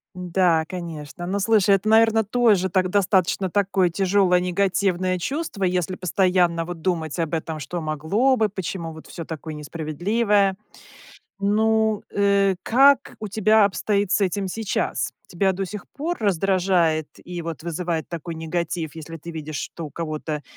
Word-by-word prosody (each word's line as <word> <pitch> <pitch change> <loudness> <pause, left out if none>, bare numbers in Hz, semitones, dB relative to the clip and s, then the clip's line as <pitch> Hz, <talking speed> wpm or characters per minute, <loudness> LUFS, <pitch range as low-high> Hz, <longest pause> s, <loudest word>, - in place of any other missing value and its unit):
Да, 180 -2 +2
конечно. 165 -2 -7
Ну, 195 +3 -1
слушай, 200 -1 +4
это, 195 +2 0
наверно, 225 0 +5
тоже 210 -4 +2
так 185 0 +2
достаточно 190 -1 +2
такое 190 -2 +2
тяжелое, 185 0 +3
негативное 185 0 0
чувство, 270 - -3
если 180 0 0
постоянно 180 -2 +1
вот 175 0 -7
думать 165 -3 -2
об 165 -1 -1
этом: 160 -1 -3
что 170 +5 -4
могло 160 - +1
бы, 220 -2 +2
почему 185 -4 -5
вот 160 0 -12
всё 165 - -7
такое 160 0 -7
несправедливое. 190 +7 0 0.9
Ну, 220 +1 +2
э, 200 -1 +3
как 275 +4 +4
у 215 - -5
тебя 215 +1 +4
обстоит 200 0 0
с - - +3
этим 195 0 0
сейчас? 210 +2 -2 0.2
Тебя 190 +2 +1
до 195 +1 -3
сих 205 +2 -8
пор 330 +5 -2
раздражает 180 -5 +1 0.2
и 175 -1 -6
вот 165 -1 -6
вызывает 170 -1 -3
такой 170 0 -6
негатив, 160 -1 -3
если 165 0 -8
ты 165 +2 -9
видишь, 155 -2 -6
что 165 +3 -5
у - - -10
кого-то 155 -1 -4
185 Hz, 150 wpm, -23 LUFS, 165-200 Hz, 0.9 s, наверно